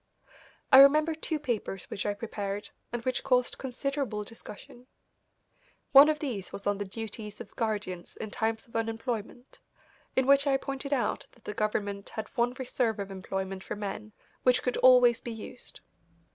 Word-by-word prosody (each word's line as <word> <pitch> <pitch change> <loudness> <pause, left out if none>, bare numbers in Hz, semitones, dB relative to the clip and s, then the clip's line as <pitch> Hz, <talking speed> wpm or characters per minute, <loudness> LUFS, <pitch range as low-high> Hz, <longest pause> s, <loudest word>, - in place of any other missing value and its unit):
I 265 - +10
remember 305 +4 +7
two 315 0 -2
papers 235 -9 -3
which 195 - -3
I 205 - 0
prepared 205 -1 -5 0.2
and 240 -1 -4
which 255 -1 0
caused 250 -2 +2
considerable 265 -4 -2
discussion. 230 +3 -12 1.0
One 280 +2 +9
of 305 - +1
these 240 - -4
was 200 - -7
on 205 0 +1
the 205 - -2
Duties 210 +1 -7
of - - -10
Guardians 205 -6 -3
in 215 - -6
Times 225 +3 -1
of 230 - -19
Unemployment, 225 +1 -4 0.6
in 260 - +3
which 280 +1 +5
I 270 -1 +4
pointed 275 +1 -5
out 270 -4 0
that 240 - -24
the 210 - -5
government 205 -1 -2
had 220 - -6
one 240 +1 0
reserve 245 -4 -1
of 200 -1 -5
employment 190 0 -4
for - - -5
men 210 +1 -5 0.3
which 250 0 +3
could 250 - 0
always 250 -2 +6
be 240 - -5
used. 225 +2 -10
230 Hz, 165 wpm, -29 LUFS, 205-260 Hz, 1.0 s, I